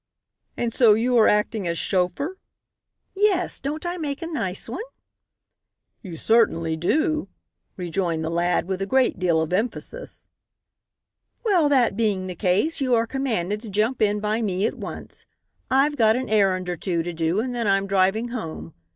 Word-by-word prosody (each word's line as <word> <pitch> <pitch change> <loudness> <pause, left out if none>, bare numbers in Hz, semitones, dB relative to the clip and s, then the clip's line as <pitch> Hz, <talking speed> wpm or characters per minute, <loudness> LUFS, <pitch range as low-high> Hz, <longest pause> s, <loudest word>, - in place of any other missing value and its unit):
"And 235 -1 -1
so 230 -4 +6
you 245 +3 +1
are 220 - +6
acting 210 -2 +1
as 170 0 -1
chauffeur?" 190 - -1 0.7
"Yes, 390 -3 +1
don't 300 +5 -4
I 350 +1 -2
make 295 -2 -4
a - - -3
nice 230 - -3
one?" 250 - -5 1.2
"You 180 -7 -8
certainly 165 -7 +2
do," 305 - 0 0.5
rejoined 170 -2 -2
the 160 - -2
lad 175 +1 +1
with 190 0 -3
a 195 - -1
great 260 -4 +2
deal 170 -3 +2
of 160 - -4
emphasis. 245 - -3 1.2
"Well, 355 -9 +3
that 255 -7 +3
being 205 -4 0
the 185 - -5
case, 200 - +1
you 255 -2 +3
are 230 0 +2
commanded 220 -6 -2
to 225 - -9
jump 215 +5 0
in 210 -1 +2
by 215 +2 -1
me 195 -2 0
at - - 0
once. - - -8 0.4
I've 280 +3 +2
got 220 -2 +4
an 255 +1 -3
errand 190 -4 +2
or 175 -1 -3
two 170 -3 -1
to 175 +1 -4
do 165 +4 0
and 250 +2 -2
then 235 -3 -1
I'm 195 0 +2
driving 195 +4 +1
home. 165 -9 -6
215 Hz, 170 wpm, -23 LUFS, 180-260 Hz, 1.2 s, so